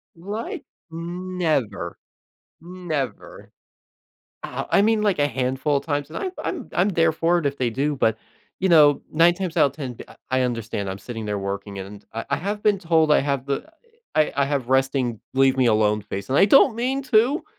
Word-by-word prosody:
Like, 205 +7 -6 0.3
never. 165 - -2 0.6
Never. 170 -6 -5 0.9
Ah, - - -5
I - - +5
mean, 220 0 +2
like, 200 -7 +1
a 145 - +3
handful 130 +3 0
of - - -5
times, 145 -1 -2
and - - -7
I'm 375 - -3
I'm 325 -9 -4
I'm 185 +4 +2
there 165 -3 +3
for 170 +2 +1
it 150 - -6
if 140 0 -1
they 125 -2 0
do, 140 +5 -1
but, 110 -3 +1 0.4
you 190 - +1
know, 150 -4 +6
9 170 +2 +5
times 180 -2 -4
out 145 - +5
of - - -7
10 130 -6 -6
th - - -10 0.2
I 130 0 +1
understand, 115 -5 -2
I'm 95 - -5
sitting 110 +1 -7
there 105 -1 -2
working, 100 0 -5
and 100 +2 -9
I 115 - -4
I - - +2
have 205 +3 -3
been 205 -3 +3
told 165 -3 +2
I - - +6
have 140 -1 -2
uh, 140 - 0
a 320 - -22 0.5
I 155 - +2
I - - +1
have 140 -4 -2
resting 130 -3 +1
leave-me-alone 120 -6 +3
face, 100 +2 -6
and 135 - +2
I 195 - +7
don't 250 +1 +5
mean 265 +3 -1
to. 255 - +2
145 Hz, 195 wpm, -23 LUFS, 120-180 Hz, 0.9 s, I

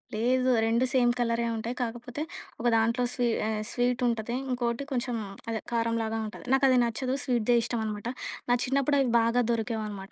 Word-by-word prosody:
లేదు. 255 +3 +2 0.2
2 230 +3 +2
సేమ్ 245 -2 +4
కలరే 235 0 +1
ఉంటాయి. 230 +3 -3
కాకపోతే, 240 +3 -4 0.4
ఒక 240 - 0
దాంట్లో 230 +2 +2
స్వీ 245 -2 +1 0.2
ఆహ్, 215 -1 -1
స్వీటుంటది. 245 -2 0 0.2
ఇంకోటి 240 +1 -1
కొంచెం 245 -1 -1 0.3
అదే 220 -1 -1
కారంలాగా 230 -1 0
ఉంటది. 215 - -9
నాకది 265 -1 +5
నచ్చదు. 255 +3 -1
స్వీట్‌దే 240 -2 +2
ఇష్టం 235 0 -2
అనమాట. 210 +1 -4 0.4
నా - - +5
చిన్నప్పుడు 275 +2 +2
అవి 260 -3 +2
బాగా 230 +2 +3
దొరికేవనమాట. 215 -4 -3
235 Hz, 155 wpm, -28 LUFS, 225-250 Hz, 0.4 s, నాకది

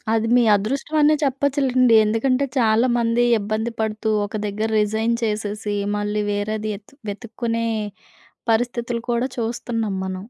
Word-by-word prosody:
అది 225 0 +1
మీ 245 - +5
అదృష్టవనే 285 +8 +2
చెప్పచ్చులెండి. 265 -3 +2
ఎందుకంటే, 255 +5 +1
చాలామంది 235 +1 +2
ఇబ్బంది 215 +3 -2
పడుతూ, 220 0 -1 0.2
ఒక 215 - -6
దగ్గర 215 +2 -2
రిజైన్ 220 +2 +1
చేసేసి, 210 -1 -2 0.2
మళ్ళీ 210 0 -1
వేరేది 215 +1 -2
యెతు 210 +6 -13 0.2
వెతుక్కునే 230 +2 -3 0.9
పరిస్థితులు 235 0 -1
కూడా 240 +3 0
చూస్తన్నాం 225 -3 -2
మనం. 190 0 -3
225 Hz, 115 wpm, -22 LUFS, 215-245 Hz, 0.9 s, మీ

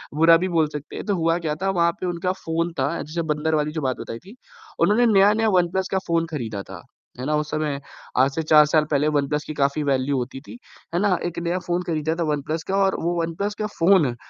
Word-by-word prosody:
बुरा 165 +2 +6
भी 185 - -1
बोल 160 -3 +2
सकते 150 0 -7
हैं - - -6
तो 205 -2 0
हुआ 165 0 +1
क्या 150 - 0
था 195 - +1
वहाँ 170 -3 +2
पे - - -2
उनका 175 +1 -1
फ़ोन 165 +1 -1
था 130 - +2
जैसे 155 +4 -4
बंदर 155 +1 -1
वाली 150 0 0
बताई 130 -3 -3
थी 200 - -15 0.4
उन्होंने 225 +4 +4
नया-नया 210 +3 +4
वन 180 -3 +3
प्लस 190 0 -1
का 190 - +1
फ़ोन 165 0 +1
खरीदा 110 -9 -4
था - - -8 0.4
है 130 - -4
ना 150 +2 +1
उस 150 0 -2
समय 150 -2 -1 0.4
आज 135 +2 +4
से 160 - -1
4 150 -1 +6
साल 150 0 +2
पहले 145 +1 +2
वन 140 - -1
प्लस 150 0 -1
की 155 - -4
काफ़ी 140 +1 0
वैल्यू 135 0 +1
होती 130 +2 -4
थी, 150 - -11 0.4
है 175 - +1
ना, 195 -4 +2
एक 175 -1 -3
नया 170 +2 -1
फ़ोन 175 0 -2
खरीदा 160 0 -1
था 170 - -1
वन 150 -2 -1
प्लस 160 +3 -3
का 195 - +1
और 190 -1 +2
वो 175 +1 0
वन 165 0 -3
प्लस 205 +3 -2
का 210 - -1
फ़ोन 165 -8 +4
160 Hz, 250 wpm, -23 LUFS, 150-175 Hz, 0.4 s, बुरा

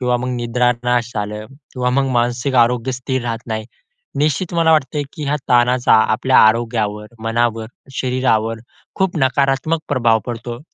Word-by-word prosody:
किंवा 125 -1 +1
मग 125 +1 -4
निद्रानाश 120 0 0
झालं 105 +1 -4 0.3
किंवा 125 -1 0
मग 135 +1 +1
मानसिक 120 +3 -1
आरोग्य 125 +2 -2
स्थिर 130 0 -3
राहत 115 0 -4
नाही. 110 -1 -3 0.5
निश्चित 155 +4 0
मला 165 -1 +3
वाटतते, 150 -1 +1
की 150 - -6
ह्या 145 +2 0
ताणाचा 125 0 +3 0.2
आपल्या 130 +4 +3
आरोग्यावर, 110 -2 +2 0.2
मनावर, 115 0 0 0.3
शरीरावर 120 -3 0 0.4
खूप 190 -2 -1
नकारात्मक 135 +4 +1
प्रभाव 120 -5 +2
पडतो. 120 0 -5
125 Hz, 140 wpm, -18 LUFS, 115-130 Hz, 0.5 s, मला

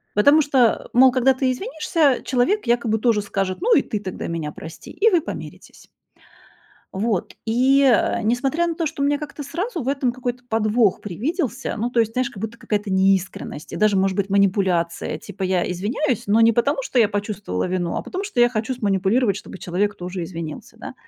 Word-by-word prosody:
Потому 285 +9 +6
что, 265 -5 +2
мол, 260 +1 +7
когда 255 +1 +3
ты 260 0 0
извинишься, 310 - 0
человек 260 - 0
якобы 235 -2 +1
тоже 220 -2 +2
скажет: 195 -2 -3
"Ну 465 +2 +4
и - - +5
ты 210 - -4
тогда 190 -3 -6
меня 160 -3 -4
прости". 160 +1 -10
И 450 +2 +3
вы 350 -5 +3
помиритесь. - - -9 1.0
Вот. 205 -1 -2
И, 260 +5 +3
а, 235 -2 +3
несмотря 265 +9 +1
на 335 - -2
то, 330 -1 -1
что 285 -2 -3
у - - +3
меня 290 0 +1
как-то 300 -1 -7
сразу 345 - -4
в 250 - -4
этом 270 -3 0
какой-то 245 0 -5
подвох 220 -1 +2
привиделся, 265 - -3
ну, 235 +2 -2
то 240 - -1
есть, 225 0 0
знаешь, 255 +3 -1
как 205 - -11
будто 225 +1 -5
какая-то 210 -2 -2
неискренность 190 -4 0
и - - -4
даже, 210 -1 +3
может 190 0 +1
быть, 200 -1 -1
манипуляция: 190 -4 +1
типа 200 -1 -9
я 185 -1 0
извиняюсь, 225 - -1
но 210 +3 +3
не 230 0 +6
потому, 270 +4 +1
что 255 - -1
я 220 - +5
почувствовала 205 - -3
вину, 180 -2 -2
а - - -2
потому, 375 +2 -5
что 400 -11 -1
я 240 - +6
хочу 225 +2 -2
сманипулировать, 200 0 +1
чтобы 190 - -9
человек 195 +4 -1
тоже 180 0 -5
извинился, 165 -3 -8
да. - - -8
230 Hz, 195 wpm, -22 LUFS, 195-265 Hz, 1.0 s, мол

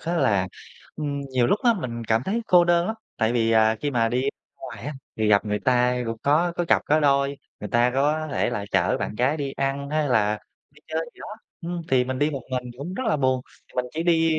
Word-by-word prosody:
á 170 +2 -2
là, 95 - +2 0.5
ừm, 145 -2 -3
nhiều 130 -3 0
lúc 205 - +2
á 235 -2 +5
mình 120 - -5
cảm 110 +2 +1
thấy 230 +4 -1
cô 175 -1 +6
đơn 175 0 +3
lắm. 220 - -2 0.2
Tại 110 +1 +1
vì, 115 -2 +2
à, 110 0 +4
khi 145 - -1
mà 115 -3 +2
đi 125 +2 0
ra 140 - 0 0.3
ngoài 130 -3 -9
á 150 - -3 0.2
thì 110 -1 +1
gặp 100 0 +4
người 105 -1 -1
ta 130 - +2
ai 125 0 +2
cũng 115 0 -3
có 165 +5 +3
có 175 - 0
cặp - - +4
có 155 +1 +3
đôi, 140 -1 +2 0.2
người 105 - -5
ta 120 +3 +3
có 150 +3 +1
thể - - 0
là 105 -4 -3
chở 90 -1 +2
bạn - - -3
gái 130 +7 +1
đi 140 -2 -3
ăn 140 +1 -2
hay 155 -2 +1
là 105 -3 +2 0.3
đi 145 +1 -21
chơi 160 0 -1
gì - - -19
đó. - - -7 0.3
Ừm, 170 0 -4
thì 125 -1 +3
mình 130 0 -3
đi 150 +1 +2
một 135 -4 -5
mình 125 -1 -1
thì 120 - -22
cũng 170 +7 -5
rất 260 - -3
là 205 - +2
buồn, 130 -2 +1 0.3
thì - - -23
mình 125 0 0
chỉ 165 - -2
đi, 165 -2 +3
135 Hz, 265 wpm, -24 LUFS, 120-155 Hz, 0.5 s, cô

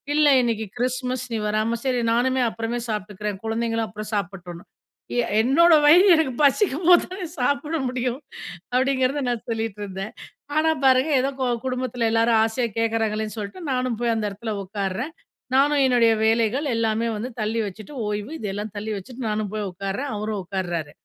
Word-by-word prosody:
"இல்ல 300 0 +5
இன்னிக்கு 230 -2 -1
கிறிஸ்மஸ். 255 0 -1
நீ - - 0
வராம, 215 +2 0
சரி, 250 -2 +1
நானுமே 255 +2 +2
அப்புறமே 225 +2 -3
சாப்பிட்டுக்கிறேன்." 210 -1 -4
குழந்தைங்களும் 225 0 -1
அப்புறம் 215 +1 -8
சாப்பிடட்டும்னு. 180 -3 -5 0.5
"எ - - +3 0.2
என்னோட 330 +7 +5
வயிறு 350 +7 +7
எனக்கு 295 -6 +1
பசிக்கும் 320 - +2
போது 350 -1 +7
தானே 370 -2 -5
சாப்பிட 285 +5 0
முடியும்" 255 +2 -2 0.5
அப்படிங்கிறத 260 +2 +1
நான் 240 -2 -3
சொல்லிட்டு 225 -2 -3
இருந்தேன். 195 +3 -6 0.4
ஆனா 315 +1 +3 0.2
பாருங்க, 260 +3 +5
ஏதோ 270 - 0
கொ 255 - +1 0.2
குடும்பத்துல 250 -2 -1
எல்லாரும் 225 0 +3
ஆசையா 225 +2 0
கேட்கறாங்களேன்னு 220 -1 -1
சொல்லிட்டு, 210 - -6
நானும் 250 -3 -1
போய் 235 -1 +2
அந்த 220 -1 -1
இடத்தில 215 +3 -5
உட்காருறேன். 200 - -3 0.4
நானும் 285 +1 +4
என்னுடைய 240 -3 +4
வேலைகள் 230 +5 +2
எல்லாமே 225 0 0
வந்து 235 +4 -4
தள்ளி 220 +2 -1
வச்சுட்டு, 215 +8 -9
ஓய்வு 210 +5 -3
இதெல்லாம் 205 0 -4
தள்ளி 210 +2 -4
வச்சுட்டு, 250 +7 -9
நானும் 210 -1 -1
போய் 215 -1 -2
உட்காருறேன். 195 +9 -4
அவரும் 210 -1 -3
உட்காருறாரு. 175 -5 -3
230 Hz, 155 wpm, -23 LUFS, 210-255 Hz, 0.5 s, வயிறு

